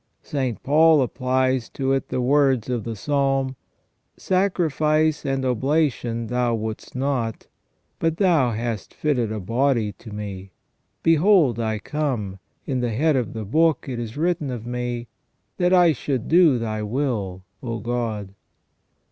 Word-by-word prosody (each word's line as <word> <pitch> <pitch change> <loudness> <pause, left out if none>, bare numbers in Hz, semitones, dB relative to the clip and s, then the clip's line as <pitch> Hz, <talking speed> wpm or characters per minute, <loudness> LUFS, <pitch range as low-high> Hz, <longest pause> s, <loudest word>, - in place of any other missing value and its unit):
St. 130 -6 -3
Paul 155 0 +5
applies 130 0 0
to 135 -1 -1
it 135 - -1
the 125 - -1
words 135 -2 +2
of 120 -3 -2
the 115 -1 -4
Psalm: 135 +2 0 0.6
"Sacrifice 155 -5 +1
and 135 -1 -1
oblation 125 -2 0
Thou 125 0 0
wouldest 110 +1 -6
not; 130 -4 -2 0.5
but 165 -1 0
Thou 165 -10 +3
hast 115 -2 -4
fitted 125 -8 0
a 110 - -3
body 115 +1 +1
to 105 +4 -13
Me. 100 -2 -7 0.5
Behold 165 - +4
I 110 -1 -1
come; 110 -6 -3 0.3
in 130 -3 -1
the 120 -1 0
head 145 +7 +2
of 125 -4 -1
the 110 -1 -5
book 160 +8 +2
it 125 -3 -4
is 115 +2 -6
written 165 -3 0
of 120 -3 -5
Me, 120 -1 -3 0.5
that 180 0 +2
I 175 -3 +6
should 130 -2 -3
do 165 -5 +5
Thy 110 -2 -3
will, 105 -6 -2 0.2
O 115 -2 -3
God." 115 -4 -3
130 Hz, 145 wpm, -23 LUFS, 115-150 Hz, 0.6 s, I